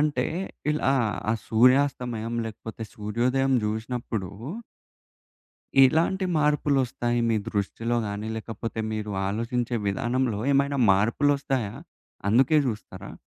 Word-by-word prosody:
అంటే 150 0 +1 0.4
ఇలా 150 -3 +1 0.4
ఆ - - +3 0.2
సూర్యాస్తమయం 125 -1 +2
లేకపోతే 110 +1 -8
సూర్యోదయం 125 +6 0
జూశినప్పుడు 110 -2 -3 1.5
ఇలాంటి 160 +8 +4
మార్పులొస్తాయి 135 -5 +1
మీ 115 - +2
దృష్టిలో 115 +4 -1
గాని 105 +1 -4
లేకపోతే 115 0 -5
మీరు 105 -1 -3 0.2
ఆలోచించే 115 +3 -1
విధానంలో 120 +2 0
ఏమైనా 140 0 +2
మార్పులొస్తాయా? 130 +3 +1 0.5
అందుకే 130 +8 +4
జూస్తారా? 110 -4 -6
120 Hz, 90 wpm, -26 LUFS, 110-135 Hz, 1.5 s, ఇలాంటి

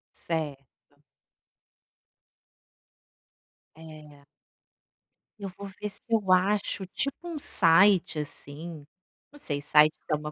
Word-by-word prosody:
Certo. 145 -3 -6 2.8
É. 155 -3 -13 1.2
Eu 195 - -5
vou 200 0 -7
ver 210 - -2
se 200 - -14
eu 210 -5 +1
acho 190 +1 +2
tipo 275 +8 -2
um 330 -3 -5
site, 185 - +4
assim. 150 +2 -8 0.5
Não 290 - -16
sei, 145 - -3
sites 150 +1 +5
é 150 - +3
uma 150 0 -6
165 Hz, 100 wpm, -28 LUFS, 150-200 Hz, 2.8 s, sites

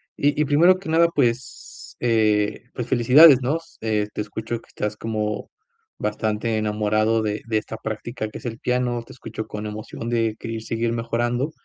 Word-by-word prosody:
Y 145 +1 +1
y 150 - +3
primero 165 +6 +5
que 185 -3 -8
nada, 165 +1 +5
pues, 125 -2 -2
eh, 110 -2 +1
pues, 120 - -3
felicidades 130 +4 +7
¿no? 135 +6 +1 0.2
Eh, 105 -2 0
te - - -2
escucho 110 +2 -4
que - - -23
estás 105 0 -4
como 105 -1 -3 0.5
bastante 110 +1 -1
enamorado 110 +1 +1
de 105 0 -2
de 110 -1 +1
esta 110 +1 -4
práctica 110 +1 -4
que - - -8
es - - -13
el 115 -1 -4
piano, 125 -1 0
te - - -13
escucho 115 -3 -7
con 105 0 -6
emoción 110 +2 -6
de 115 -2 +1
querer 115 -1 -5
seguir 115 +1 -1
mejorando. 120 +4 -1
115 Hz, 175 wpm, -23 LUFS, 110-125 Hz, 0.5 s, felicidades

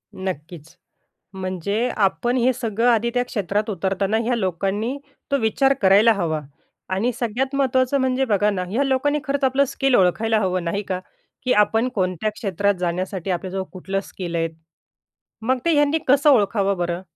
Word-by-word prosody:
नक्कीच. 165 -3 -7 0.6
म्हणजे 190 +5 -2
आपण 240 +5 +1
हे 250 +1 +3
सगळं 230 -1 -1
आधी 235 0 +2
त्या 245 0 +2
क्षेत्रात 210 -1 -2
उतरताना 195 +2 0
ह्या 240 +2 0
लोकांनी 200 +5 -1 0.3
तो 280 - +3
विचार 265 +5 +2
करायला 205 +4 +6
हवा 165 -6 -1 0.5
आणि 215 +7 +1
सगळ्यात 255 +4 -1
महत्वाचं 260 0 +2
म्हणजे 260 0 +1
बघा 210 -3 +2
ना 185 -2 -2
ह्या 235 +8 +1
लोकांनी 280 +2 +1
खरंच 280 -1 -2
आपलं 265 +1 +3
स्किल 270 -1 +1
ओळखायला 220 +4 +2
हवं 185 -3 -1
नाही 170 +4 -2
का? 185 -2 -3 0.4
की 250 - +2
आपण 225 +3 +3
कोणत्या 185 0 0
क्षेत्रात 200 -1 0
जाण्यासाठी 180 +1 -3
आपल्याजवळ 190 +2 -3
कुठलं 195 +1 -3
स्किल 175 -3 -6
आहे. 165 0 +1 0.9
मग 255 +4 +1
ते 335 - +3
ह्यांनी 295 +1 +3
कसं 280 +3 +5
ओळखावं 200 -5 +2
बरं? 175 0 -2
210 Hz, 155 wpm, -22 LUFS, 185-255 Hz, 0.9 s, करायला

